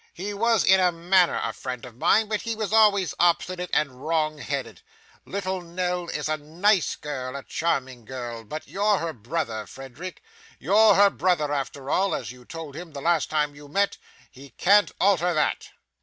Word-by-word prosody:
He 200 +4 -4
was 225 +1 +2
in 190 0 +5
a 180 -1 +4
manner 175 +1 +2
a - - -2
friend 125 -2 -6
of 120 -2 -12
mine, 215 - +3
but 210 -1 -2
he 230 -1 -3
was 215 -1 -3
always 205 -4 +4
obstinate 180 +1 +1
and 140 -4 0
wrong 155 -1 0
headed. 140 0 -4 0.4
Little 190 -1 -3
Nell 180 0 -3
is 150 - -3
a 155 0 0
nice 170 +6 +1
girl, 130 -3 -5
a 140 - -6
charming 130 -7 -2
girl, 120 -3 -6
but 155 +8 -7
you're 205 +1 +1
her 165 -2 -3
brother, 115 -2 -4
Frederick. 135 +8 -9 0.3
You're 215 +3 +5
her 200 0 +6
brother 160 -5 +1
after 140 0 -4
all; 195 +1 +2
as 125 - -5
you 125 -1 -15
told 160 -2 -8
him 165 -1 -9
the 140 - -6
last 165 0 +1
time 150 -1 0
you 145 0 -13
met, 200 +7 0 0.3
he 135 +2 -13
can't 200 - +3
alter 180 -3 +3
that. 150 - 0
165 Hz, 185 wpm, -25 LUFS, 140-190 Hz, 0.4 s, her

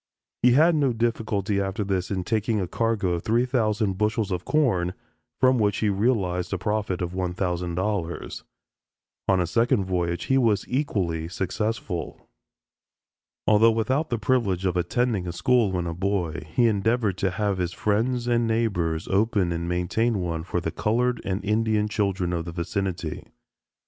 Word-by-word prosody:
He 125 0 +5
had 160 +6 +5
no 140 -5 +2
difficulty 110 -3 0
after 95 +2 -2
this 95 -2 -1
in 95 -2 -2
taking 110 +1 0
a 95 - -2
cargo 115 -1 0
of 85 -1 -1
three 115 +5 +2
thousand 110 -6 0
bushels 105 -1 0
of 90 -1 -3
corn, 95 - +1 0.4
from 130 -1 +4
which 105 -2 +2
he 110 - +1
realized 95 -4 0
a 100 - 0
profit 100 -2 -1
of 85 - -3
$1000. 90 0 -2 0.8
On 95 -1 +3
a 90 - +2
second 110 +2 +2
voyage 85 -2 -1
he 135 0 +2
was 110 -5 +2
equally 95 - -1
successful. 95 0 -3 1.2
Although 110 +2 +5
without 130 +8 0
the 120 - 0
privilege 105 -6 0
of 90 -2 +1
attending 100 +1 0
a - - -2
school 115 +3 +2
when 90 -2 -1
a 85 - -3
boy, 90 -4 -2
he 120 +9 +3
endeavored 110 -2 +1
to 95 - +1
have 100 0 -1
his 90 -1 -1
friends 115 +7 0
and 120 -1 +2
neighbors 90 -8 0
open 100 -2 +1
and 85 +1 -3
maintain 100 +6 0
one 85 -3 -2
for 90 +1 -2
the 85 -1 -3
colored 120 +6 0
and 100 +2 -3
Indian 105 0 +1
children 95 -4 -1
of 85 -1 -2
the 85 - -5
vicinity. 85 -1 -3
100 Hz, 160 wpm, -25 LUFS, 90-115 Hz, 1.2 s, He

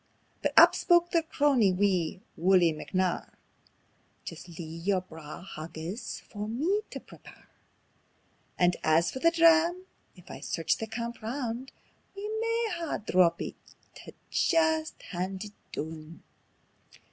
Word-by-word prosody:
But - - 0
up - - +9
spoke 345 -1 +3
their 335 - +3
crony, 280 - +3
wee 185 -2 0
Wullie 175 -1 +4
McNair: 185 +3 -1 1.0
"Jist - - -8
lea' 170 - -5 0.2
yer 195 0 +2
braw 160 -2 -10
haggis 165 +4 -6
for 210 -1 -7
me 320 - 0
tae - - -6
prepare; - - -16 1.1
And 175 0 +3
as 160 +2 +3
for 260 - -5
the 335 - +5
dram, 335 +2 +4 0.3
if 180 -2 -14
I - - -8
search 165 - -1
the 225 - -4
camp 235 +2 -5
roun', 240 +2 -4 0.5
We 400 +1 -5
maun 455 +1 -1
hae 335 -2 -2
a - - -1
drappie 180 -5 +2 0.4
tae - - -12 0.2
jist 320 -2 +1
haud 185 +2 -3
it 210 - -9 0.2
doon. 160 +1 -7
210 Hz, 135 wpm, -29 LUFS, -, 1.1 s, up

